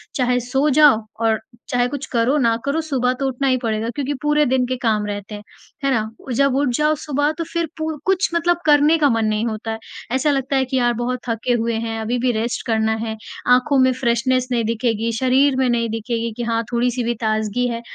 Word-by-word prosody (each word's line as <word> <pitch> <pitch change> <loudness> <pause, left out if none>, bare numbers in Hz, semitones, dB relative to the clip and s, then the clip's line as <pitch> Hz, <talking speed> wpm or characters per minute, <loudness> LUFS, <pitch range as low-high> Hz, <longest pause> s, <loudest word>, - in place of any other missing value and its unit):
चाहे 250 -2 +1
सो 275 +3 +2
जाओ 290 -5 +5 0.2
और 220 -1 +2 0.3
चाहे 245 0 +1
कुछ 285 +1 -5
करो 240 +5 +2
ना 230 -4 +2
करो, 300 +4 0
सुबह 255 -5 0
तो 270 - 0
उठना 265 +1 -1
ही 255 -1 +3
पड़ेगा 220 0 -1
क्योंकि 285 0 -2
पूरे 295 0 +2
दिन 255 -1 +1
के 255 0 -2
काम 210 -1 +1
रहते 205 +1 -5
हैं। 205 - -9 0.4
है 275 - +2
ना? 220 -3 0 0.2
और 255 - -4
जब 275 +1 +2
उठ 280 -1 +1
जाओ 305 +1 +2
सुबह, 290 +1 +1
तो 335 +2 -4
फिर 335 -1 0
पूर 315 -1 -3
कुछ 380 0 +2
मतलब 345 +1 +2
करने 300 +2 +5
का 290 -3 +3
मन 225 -2 +1
नहीं 215 +1 0
होता 220 -2 -3
है। 220 - -3 0.3
ऐसा 290 +3 +2
लगता 275 0 -1
है 265 -1 +2
कि, 260 +1 -2
"यार, 240 -1 +2
बहुत 245 +2 -2
थके 230 +2 -1
हुए 230 0 -1
हैं, 225 -1 -3
अभी 240 +3 -1
भी 250 0 +1
रेस्ट 230 +1 -2
करना 220 -1 +1
है। 220 -1 -3 0.4
आँखों 270 +2 +1
में 260 0 +5
फ़्रेशनेस 255 +1 +1
नहीं 235 -2 +1
दिखेगी, 230 0 -1
शरीर 260 +1 +3
में 260 -1 +2
नहीं 230 -1 0
दिखेगी 230 +1 -3
कि 240 - -3
हाँ 230 0 0
थोड़ी-सी 245 +1 0
भी 240 +1 0
ताज़गी 220 +2 0
है।" 235 0 -4
250 Hz, 225 wpm, -20 LUFS, 230-275 Hz, 0.4 s, जाओ